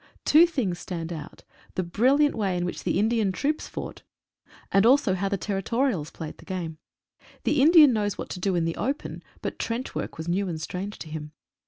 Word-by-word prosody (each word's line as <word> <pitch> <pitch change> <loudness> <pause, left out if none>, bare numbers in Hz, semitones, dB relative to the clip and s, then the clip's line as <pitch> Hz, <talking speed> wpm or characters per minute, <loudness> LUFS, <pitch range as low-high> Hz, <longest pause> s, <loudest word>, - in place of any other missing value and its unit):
Two 325 +4 +7
tilings 230 - -2
stand 170 -2 -5
out 155 -2 -9
— - - -27
the 185 - 0
bril 235 +11 +3
liant 295 -1 +4
way 195 -5 -1
in 175 - -1
which 180 - -5
the - - +1
Indian 220 -1 +2
troops 290 +11 -1
fought, - - -7 0.7
and 195 - +5
also 250 -3 +5
how 195 +1 -1
the 200 - 0
Territorials 195 - -1
played 160 -2 -8
the - - -13
game. 170 -4 -4 0.6
The 295 - +2
Indian 305 -3 +8
knows 205 -3 -1
what - - -6
to 180 - -5
do 190 0 0
in 170 -1 +1
the 165 - -2
open, 275 +3 -3 0.2
but - - -4
trench 235 +3 -3
work - - -4
was 160 +1 -6
new 190 +3 0
and 160 -2 -4
strange 185 +6 -5
to - - -8
him. 150 -1 -7
195 Hz, 210 wpm, -26 LUFS, 175-250 Hz, 0.7 s, Indian